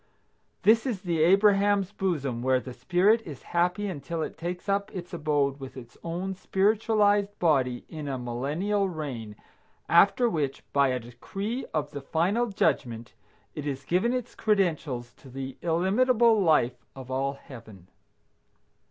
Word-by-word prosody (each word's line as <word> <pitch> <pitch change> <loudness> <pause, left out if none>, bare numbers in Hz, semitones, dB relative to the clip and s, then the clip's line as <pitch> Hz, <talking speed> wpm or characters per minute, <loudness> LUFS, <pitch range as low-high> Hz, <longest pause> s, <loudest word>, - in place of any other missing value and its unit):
This 225 +4 +5
is 215 -7 -2
the 170 -3 0
Abraham's 200 +2 +4
bosom 150 - -2
where 130 0 +2
the 125 0 -8
spirit 190 - +3
is 145 - -9
happy 180 +4 +1
until 165 -3 -4
it - - -6
takes 175 +3 -5
up 200 0 0
its 175 -1 -7
abode 145 -4 0
with 135 0 -9
its 120 -2 -11
own 180 +3 -3
spiritualized 205 +1 +2
body 130 -7 +1
in 155 -3 -7
a 135 -2 -2
millennial 150 +12 -1
reign, 130 -11 -6 0.5
after 200 +8 +5
which, 150 - -2
by 140 -1 +4
a 130 -1 0
decree 195 - -5
of 150 -2 -2
the 140 - -6
Final 185 - +1
Judgment, 120 - -1 0.4
it 150 -1 -5
is 135 -1 -4
given 185 - +1
its 250 -2 -3
credentials 160 - 0
to 135 - -15
the 135 0 -6
illimitable 215 +7 +3
life 125 -8 +2
of 130 -1 -9
all 135 +1 0
Heaven. 110 -9 -13
165 Hz, 145 wpm, -27 LUFS, 135-200 Hz, 0.5 s, This